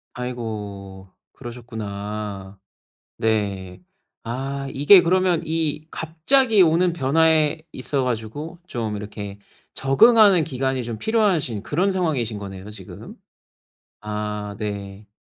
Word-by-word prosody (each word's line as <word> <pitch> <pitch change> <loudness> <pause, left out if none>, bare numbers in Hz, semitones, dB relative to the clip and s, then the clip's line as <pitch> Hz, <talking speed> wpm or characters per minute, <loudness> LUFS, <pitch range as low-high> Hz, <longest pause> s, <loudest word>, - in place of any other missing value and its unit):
아이고. 105 -6 -6 0.2
그러셨구나. 105 -5 -6 0.6
네. 100 -4 -1 0.4
아, 135 +4 -4
이게 145 +8 +7
그러면 180 -1 +2
이 155 -1 -2
갑자기 205 - +2
오는 170 +1 +3
변화에 160 +1 +2
있어 135 +1 -2
가지고 125 +8 -4
좀 110 -6 -3
이렇게 100 -1 -7 0.4
적응하는 190 - +6
기간이 130 -2 -1
좀 115 -2 -5
필요하신 180 - +1
그런 175 - 0
상황이신 135 - -1
거네요, 95 0 -8
지금. 100 -4 -11 0.9
아 105 -1 -4
네. 100 -1 -5
125 Hz, 230 characters per minute, -23 LUFS, 105-160 Hz, 0.9 s, 이게